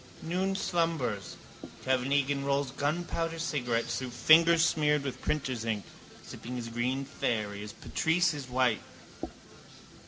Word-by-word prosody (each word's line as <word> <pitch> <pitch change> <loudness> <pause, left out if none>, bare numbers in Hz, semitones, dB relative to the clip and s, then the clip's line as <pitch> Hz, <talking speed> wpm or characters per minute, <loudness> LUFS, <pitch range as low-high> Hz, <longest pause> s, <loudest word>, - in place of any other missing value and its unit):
Noon 185 +4 0
slumbers. 160 - -1 0.5
Kevin 130 0 +1
Egan 140 0 +2
rolls 140 -1 0
gunpowder 165 +3 -2
cigarettes 125 -8 -1
through 130 -1 -4
fingers 165 +6 +6
smeared 150 -3 +2
with 135 -2 -5
printer's 130 -6 -1
ink, 110 -4 -2 0.4
sipping 125 +2 -7
his 120 -2 -4
green 125 +4 -1
fairy 105 -7 -2
as 105 - -7
Patrice 170 +1 +1
his 140 -4 -6
white. 125 -4 +2
140 Hz, 125 wpm, -30 LUFS, 120-160 Hz, 0.5 s, fingers